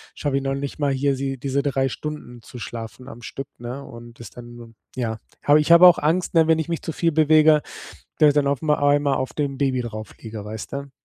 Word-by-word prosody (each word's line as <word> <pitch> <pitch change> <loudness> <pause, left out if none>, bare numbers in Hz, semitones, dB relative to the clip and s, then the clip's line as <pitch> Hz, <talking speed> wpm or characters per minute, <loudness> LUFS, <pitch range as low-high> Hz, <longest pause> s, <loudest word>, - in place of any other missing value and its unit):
schaffe 140 -2 -1
ich 140 - -3
noch 135 0 -1
nicht 140 +2 -6
mal 145 -2 +1
hier 135 +1 0
sie 135 0 -3
diese 140 +2 -2
3 135 -2 0
Stunden 135 -5 -7
zu 125 - -11
schlafen 115 +2 -8
am 120 - -11
Stück, 135 +3 -7
ne, 125 +4 -7
und 120 0 -12
das 120 - -9
dann 120 -1 -12 0.2
ja, 115 -3 -3 0.2
habe 145 +1 +5
ich 150 +3 +1
habe 170 +2 +8
auch 175 - +6
Angst, 170 +5 0
ne, 160 -1 +5
wenn 160 0 +4
ich 160 - -3
mich 165 - -2
zu 165 - -4
viel 165 -1 0
bewege, 155 0 +5 0.6
da 150 -2 +6
da 145 0 +2
auf 140 -2 0
mal 150 -1 +2
einmal 145 -1 +2
auf 130 0 -3
dem 140 -2 -2
Baby 130 -3 0
draufliege, 110 -1 -8
weißt 110 0 -8
du? 140 0 -6
140 Hz, 230 wpm, -22 LUFS, 120-150 Hz, 0.6 s, habe